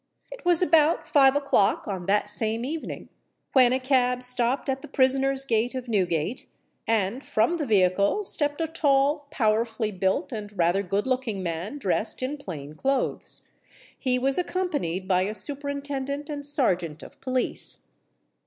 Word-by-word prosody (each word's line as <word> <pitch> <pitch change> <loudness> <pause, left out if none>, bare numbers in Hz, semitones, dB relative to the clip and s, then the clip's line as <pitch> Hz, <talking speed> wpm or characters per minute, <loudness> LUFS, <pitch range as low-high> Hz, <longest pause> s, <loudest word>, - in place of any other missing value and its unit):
It - - -10
was 350 -1 +4
about 320 0 +3
five 270 -2 +5
o'clock 280 -8 +2
on 190 -3 -4
that 205 +1 +2
same 220 +2 0
evening 315 +4 -5 0.4
when 255 -3 +6
a 260 - +1
cab 250 -1 +1
stopped 250 +2 0
at 270 0 -1
the - - -9
prisoners' 270 0 +2
gate 235 +1 0
of 255 -1 -5
Newgate; 185 -1 -1 0.4
and 225 +3 0
from 230 +11 +1
the 300 -4 -3
vehicle 200 - +2
stepped 290 -5 0
a - - +1
tall, 290 -1 +1
powerfully 225 -4 0
built, 190 -1 -1
and 210 -3 -7
rather 175 +3 +2
good 200 +2 -1
looking 250 -7 -2
man 175 - -4
dressed 220 0 0
in 280 +3 -2
plain 155 - -8
clothes. 270 - -2 0.5
He 255 -2 0
was 270 +5 +1
accompanied 290 - -2
by 185 -1 +3
a 205 +3 -2
Superintendent 285 +1 -3
and 290 -1 -5
Serjeant 180 - 0
of - - -14
Police. 255 -1 -2
250 Hz, 155 wpm, -26 LUFS, 200-280 Hz, 0.5 s, when